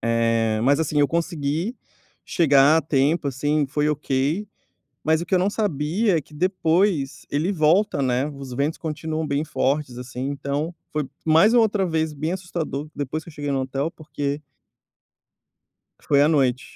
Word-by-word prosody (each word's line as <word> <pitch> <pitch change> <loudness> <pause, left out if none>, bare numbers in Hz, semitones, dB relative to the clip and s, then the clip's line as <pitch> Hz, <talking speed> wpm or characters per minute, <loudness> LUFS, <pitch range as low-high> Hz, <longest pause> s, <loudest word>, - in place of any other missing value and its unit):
Eh, 115 -1 +1
mas, 140 +4 +4
assim, 155 -2 +1
eu 145 - +3
consegui 165 - -2 0.5
chegar 145 -1 +4
a - - +4
tempo, 145 +2 +1
assim, 145 +2 0
foi 150 +2 0
ok, 150 +6 -1 0.6
mas 160 +2 +2
o - - -6
que 190 - 0
eu - - +5
não 190 +2 +2
sabia 190 -1 0
é - - -2
que 150 - -17
depois 165 -4 +1
ele 155 +6 0
volta, 165 0 +2
né, 130 +3 +1
os 135 -3 -8
ventos 140 +5 -1
continuam 160 0 -3
bem 140 +1 0
fortes, 140 -3 -1
assim, 125 +1 -6
então 145 +4 -3 0.2
foi 150 -3 -2 0.2
mais 165 +9 +5
uma 240 - +6
outra 205 -3 +1
vez 160 -2 -1
bem 155 +4 -3
assustador, 170 -6 -4
depois 145 +3 -4
que 170 - -11
eu - - -16
cheguei 145 -1 -4
no 135 -1 0
hotel, 135 +4 -2
porque 145 -2 -4 1.6
Foi 140 -1 +3
à 150 - +5
noite, 130 -5 +2
150 Hz, 170 wpm, -23 LUFS, 140-165 Hz, 1.6 s, uma